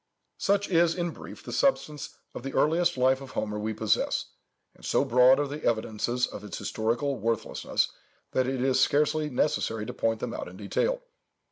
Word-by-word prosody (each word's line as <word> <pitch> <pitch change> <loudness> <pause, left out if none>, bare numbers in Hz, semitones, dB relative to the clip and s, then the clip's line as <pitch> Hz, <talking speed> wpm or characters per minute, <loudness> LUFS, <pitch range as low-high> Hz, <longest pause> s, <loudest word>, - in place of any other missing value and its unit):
Such 200 0 +2
is, 170 -2 +4
in 175 -2 -1
brief, - - -11
the - - -7
substance 155 - 0 0.2
of - - -6
the 135 +2 -6
earliest 170 +1 +3
life 130 +1 +3
of 135 - -9
Homer 105 -1 -2
we 110 +1 -2
possess, 110 -1 0 0.4
and - - -22
so - - +2
broad 125 +3 +6
are 145 - 0
the 145 +2 -6
evidences 120 +2 0
of 105 - -9
its 105 - -6
historical 120 +5 -1
worthlessness, 115 +1 0 0.4
that 130 -1 +1
it 130 -1 -1
is 130 -1 +3
scarcely 150 +1 +2
necessary 115 -5 0
to - - -5
point 115 -1 0
them 115 - -4
out - - -5
in 90 +1 -11
detail. - - -1
130 Hz, 180 wpm, -28 LUFS, 115-150 Hz, 0.4 s, broad